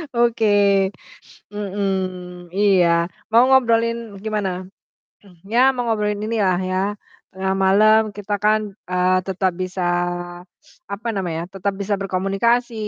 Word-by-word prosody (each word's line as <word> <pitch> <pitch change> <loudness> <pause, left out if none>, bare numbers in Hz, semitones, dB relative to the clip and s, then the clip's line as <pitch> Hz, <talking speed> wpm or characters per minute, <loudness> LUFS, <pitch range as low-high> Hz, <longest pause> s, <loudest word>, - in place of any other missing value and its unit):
Oke. 205 -4 +3 0.6
Mmm. 185 -3 -4
Iya, 195 -2 +3 0.4
mau 235 +2 +6
ngobrolin 230 -4 +1
gimana? 195 -4 -3 0.6
Mmm, 180 -4 -20
ya 235 - +3
mau 245 -1 -2
ngobrolin 210 -1 -1
inilah 205 -5 +1
ya, 185 - 0 0.6
tengah 190 0 -1
malam 215 +3 +5 0.2
kita 205 0 -3
kan, 215 +1 +3 0.3
eee, 185 0 +2
tetap 190 -1 0
bisa 185 -1 -2 1.0
apa 210 +4 -5
namanya, 175 -4 -3
tetap 195 +1 -2
bisa 200 +1 -1
berkomunikasi, 195 +6 0
200 Hz, 110 wpm, -21 LUFS, 185-215 Hz, 1.0 s, mau